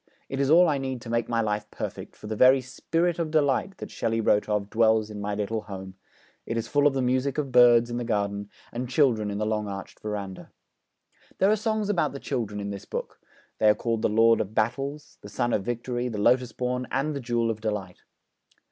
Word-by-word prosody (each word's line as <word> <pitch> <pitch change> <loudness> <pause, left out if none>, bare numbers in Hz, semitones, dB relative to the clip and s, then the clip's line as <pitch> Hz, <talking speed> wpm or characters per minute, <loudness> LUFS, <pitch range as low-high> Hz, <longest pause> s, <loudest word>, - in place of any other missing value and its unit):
It 135 - -3
is 140 -1 +1
all 175 +3 +7
I 145 -3 +1
need 130 -2 -3
to 115 - -7
make 115 0 0
my 115 -1 +1
life 105 -1 -2
perfect, - - -6
for - - -13
the 110 +1 -3
very 130 +4 +6
"Spirit 165 +6 -1
of 165 -2 -1
Delight" 155 +4 +1
that - - -8
Shelley 115 0 -1
wrote 105 -1 +2
of 105 -1 0
dwells 110 -1 +3
in 105 -1 -6
my 100 0 -2
little 105 +2 -2
home; 95 -3 -8 0.5
it 115 - -3
is 115 0 -2
full 145 +4 +3
of 140 - 0
the 135 - +1
music 130 +2 0
of 140 -3 -2
birds 120 -1 +6
in 120 - -2
the 120 - -2
garden 100 -2 -2 0.2
and 120 +1 -4
children 125 -7 +2
in 100 - -3
the 105 - -1
long 105 -1 -1
arched 100 -1 -7
verandah.' 100 -3 -6 0.9
There 195 +2 +4
are - - +4
songs 215 -1 -1
about 170 -9 +1
the 140 - -6
children 105 -6 -3
in 100 0 -4
this 100 -1 -7
book; - - -6 0.4
they 110 - +5
are 105 - +5
called 115 -2 -2
the - - +2
Lord 115 +2 +4
of 105 +2 -6
Battles, 140 +6 -2
the 105 - -10
Sun 120 +3 -1
of 100 - +1
Victory, 120 +2 -2
the 110 - -5
Lotus 125 +3 +3
born, 125 +1 -2
and 145 +3 -1
the - - -2
Jewel 120 -1 0
of 110 -1 -7
Delight. 105 -5 -4
115 Hz, 230 wpm, -26 LUFS, 105-135 Hz, 0.9 s, all